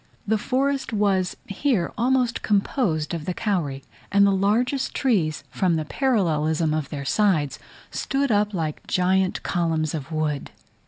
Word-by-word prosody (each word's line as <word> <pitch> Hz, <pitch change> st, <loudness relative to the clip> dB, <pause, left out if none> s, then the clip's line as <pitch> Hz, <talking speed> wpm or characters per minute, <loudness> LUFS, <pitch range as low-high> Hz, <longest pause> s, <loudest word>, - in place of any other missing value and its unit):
The 220 Hz, +1 st, +2 dB
forest 270 Hz, +4 st, 0 dB
was 195 Hz, -3 st, +1 dB
here 200 Hz, -, 0 dB
almost 245 Hz, 0 st, +1 dB
composed 195 Hz, -, 0 dB
of 160 Hz, -3 st, -4 dB
the 180 Hz, -, -2 dB
kauri; 165 Hz, -11 st, -1 dB, 0.3 s
and 200 Hz, 0 st, +5 dB
the 200 Hz, -, +4 dB
largest 220 Hz, +8 st, +1 dB
trees, 180 Hz, -, +1 dB
from 180 Hz, -4 st, +1 dB
the 155 Hz, -1 st, -1 dB
parallelism 160 Hz, -, +1 dB
of 155 Hz, -3 st, -2 dB
their 140 Hz, -2 st, -5 dB
sides, 170 Hz, -7 st, +1 dB, 0.3 s
stood 275 Hz, -1 st, -1 dB
up 210 Hz, 0 st, +2 dB
like 160 Hz, -6 st, -4 dB
gigantic 185 Hz, +1 st, +1 dB
columns 165 Hz, -3 st, 0 dB
of 155 Hz, -1 st, -5 dB
wood. 155 Hz, -3 st, -2 dB
190 Hz, 145 wpm, -24 LUFS, 155-220 Hz, 0.3 s, and